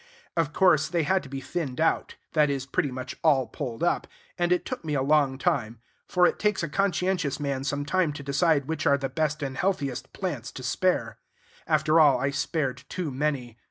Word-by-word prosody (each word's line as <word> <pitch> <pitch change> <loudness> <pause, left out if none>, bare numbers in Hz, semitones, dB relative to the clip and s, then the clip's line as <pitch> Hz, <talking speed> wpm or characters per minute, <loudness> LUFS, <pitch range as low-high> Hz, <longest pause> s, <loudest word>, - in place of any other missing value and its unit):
Of 165 -3 +1
course, 155 -2 +4
they 170 0 0
had 190 +4 +2
to 140 - -12
be 135 0 -5
thinned 140 -4 -4
out; 165 +1 +1 0.2
that 150 -2 +4
is, 135 -2 -2
pretty 140 +1 0
much 130 +1 -6
all 140 -5 +4
pulled 125 -1 -5
up; 175 - +1 0.3
and 175 -1 0
it 180 - +2
took 255 -6 -5
me 150 -2 -2
a 135 - +1
long 140 -2 +3
time; 125 -8 -1 0.3
for 180 -1 +4
it - - +1
takes 210 -4 +1
a 170 - -2
conscientious 180 -4 0
man 140 -2 -2
some 140 +1 -2
time 175 0 +1
to 145 - -8
decide 140 0 +2
which 160 -1 -1
are 140 - +5
the 135 -1 -3
best 155 +2 -1
and 135 -1 -3
healthiest 140 -9 -1
plants 150 - -4
to 130 - -8
spare. 120 - 0 0.5
After 155 +1 +3
all, 145 -5 +6
I 140 +2 0
spared 135 -2 -2
too 175 -6 -3
many. 130 -4 -2
145 Hz, 205 wpm, -26 LUFS, 135-170 Hz, 0.5 s, all